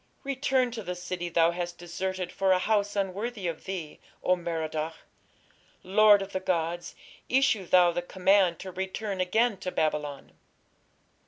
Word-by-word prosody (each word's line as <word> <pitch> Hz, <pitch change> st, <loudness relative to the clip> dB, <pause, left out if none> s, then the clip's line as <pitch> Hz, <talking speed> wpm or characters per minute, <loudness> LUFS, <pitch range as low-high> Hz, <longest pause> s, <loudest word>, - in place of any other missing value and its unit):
Return 265 Hz, -2 st, +1 dB
to 230 Hz, -1 st, -5 dB
the 180 Hz, -2 st, -4 dB
city 180 Hz, -1 st, -4 dB
thou 165 Hz, 0 st, +3 dB
hast 175 Hz, 0 st, -4 dB
deserted 185 Hz, +1 st, -4 dB
for 190 Hz, -1 st, +2 dB
a -, -, +4 dB
house 205 Hz, +1 st, 0 dB
unworthy 200 Hz, +2 st, -2 dB
of 170 Hz, -2 st, -4 dB
thee. 180 Hz, -6 st, -6 dB, 0.2 s
O 185 Hz, -, +4 dB
Merodach! 160 Hz, -2 st, -3 dB, 0.9 s
lord 205 Hz, +1 st, +6 dB
of 195 Hz, -, -9 dB
the 190 Hz, -, -2 dB
gods, 175 Hz, -2 st, -2 dB, 0.3 s
issue 250 Hz, -8 st, +2 dB
thou 180 Hz, -1 st, +5 dB
the 175 Hz, -, -2 dB
command 185 Hz, 0 st, +3 dB
to 190 Hz, -, -7 dB
return 190 Hz, +1 st, -3 dB
again 220 Hz, +4 st, +2 dB
to 185 Hz, -, -4 dB
Babylon." 150 Hz, -4 st, -2 dB
185 Hz, 150 wpm, -28 LUFS, 175-205 Hz, 0.9 s, lord